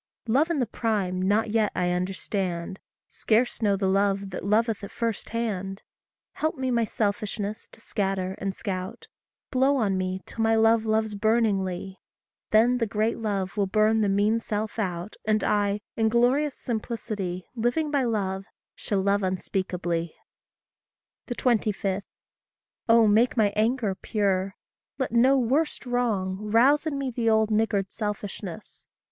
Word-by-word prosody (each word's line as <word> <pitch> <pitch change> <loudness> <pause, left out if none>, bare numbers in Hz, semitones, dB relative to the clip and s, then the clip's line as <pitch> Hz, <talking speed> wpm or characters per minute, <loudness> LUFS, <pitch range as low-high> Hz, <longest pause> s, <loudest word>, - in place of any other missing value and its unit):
Love 275 +9 +3
in 335 - 0
the 255 - +1
prime 205 -5 -1
not 210 +3 +1
yet 220 -2 +2
I 180 0 +1
understand 185 0 -3 0.3
Scarce 235 +3 0
know 200 -2 +2
the 195 - -1
love 195 0 +1
that 185 - -5
loveth 215 +1 +1
at 200 - -6
first 230 -3 -3
hand: 195 -4 -3 0.5
Help 315 -1 -2
me 260 -1 -1
my 235 -1 +2
selfishness 210 0 -3
to - - -17
scatter 195 -4 -2
and 195 -1 -3
scout; 190 +2 -5 0.5
Blow 265 +2 +3
on 200 -6 +1
me 185 0 -2
till 225 - -6
my 225 0 +3
love 225 0 +4
loves 220 0 +1
burningly; 200 -4 0 0.5
Then 240 +3 +4
the 230 - +1
great 215 +3 0
love 200 -4 -2
will 200 -2 +1
burn 215 +2 +3
the 205 - +2
mean 205 +3 +2
self 215 0 -3
out, 180 -1 -3
And 215 -1 +2
I, 205 0 +1
in 220 -1 +2
glorious 255 +5 +2
simplicity, 215 -6 -4
Living 250 +6 0
by 280 -2 +2
love, 195 -5 -1 0.3
shall 200 -2 -2
love 200 +1 +2
unspeakably. 180 -3 -2 1.1
25. 210 -5 0 0.9
Oh, 230 0 +7
make 220 +4 +3
my 205 -2 +3
anger 220 -1 +1
pure 195 -2 -1 0.4
let 265 - -2
no 255 +4 +5
worst 270 +5 0
wrong 220 -7 0
Rouse 240 +9 +3
in 290 -3 -2
me 270 -2 -2
the 230 -1 0
old 220 0 +3
niggard 210 -3 +1
selfishness. 210 -2 -6
215 Hz, 145 wpm, -26 LUFS, 195-230 Hz, 1.1 s, Oh